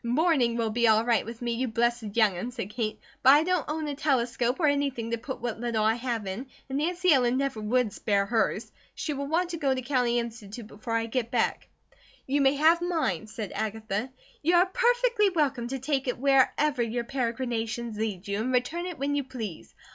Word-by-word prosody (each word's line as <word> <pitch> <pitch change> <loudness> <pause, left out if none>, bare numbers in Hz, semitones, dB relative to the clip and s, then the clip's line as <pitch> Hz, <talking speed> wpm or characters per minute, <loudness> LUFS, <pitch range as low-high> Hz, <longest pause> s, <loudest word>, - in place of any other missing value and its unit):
"Morning 250 -1 +2
will 225 -2 0
be 235 +1 +2
all 220 +1 +4
right 235 -3 +2
with 230 +1 -8
me, 240 - -1
you 250 +3 -1
blessed 235 -2 0
youngun," 215 0 +2
said 210 -5 -5
Kate, 215 -1 -3 0.2
"but 265 - +8
I 295 +2 +5
don't 360 -1 0
own 310 0 -2
a 290 - -2
telescope 255 -3 0
or 325 - +2
anything 280 -5 0
to 235 - 0
put 260 +3 -6
what 235 -2 -4
little 230 -2 0
I 220 +1 +4
have 235 -2 -3
in, 195 +8 -5 0.2
and 270 +1 -2
Nancy 355 +2 +2
Ellen 250 -2 +3
never 270 -5 -1
would 225 0 +1
spare 200 -2 +1
hers; 225 +1 0 0.2
she 310 - -3
will 280 0 -4
want 345 +4 0
to 335 - -3
go 275 -4 +1
to 255 - -3
County 245 -2 +1
Institute 230 -1 -5
before 215 +2 -7
I 225 0 +1
get 230 0 -2
back." 235 -1 0 0.6
"You 280 +2 +1
may 270 +1 +4
have 320 +4 +4
mine," 305 - -1
said 215 -2 -6
Agatha. 220 +1 -3 0.3
"You 340 +4 +3
are 350 +1 +6
perfectly 475 +1 +2
welcome 280 -9 0
to 270 +2 -3
take 270 0 -1
it 250 - -1
wherever 275 +1 +3
your 235 +1 -1
peregrinations 235 -2 -2
lead 210 -3 -3
you, 200 +1 -1
and 250 +3 -1
return 315 +8 0
it 355 - -6
when 280 +2 -1
you 285 -1 0
please. 225 -9 -7
245 Hz, 210 wpm, -27 LUFS, 225-285 Hz, 0.6 s, but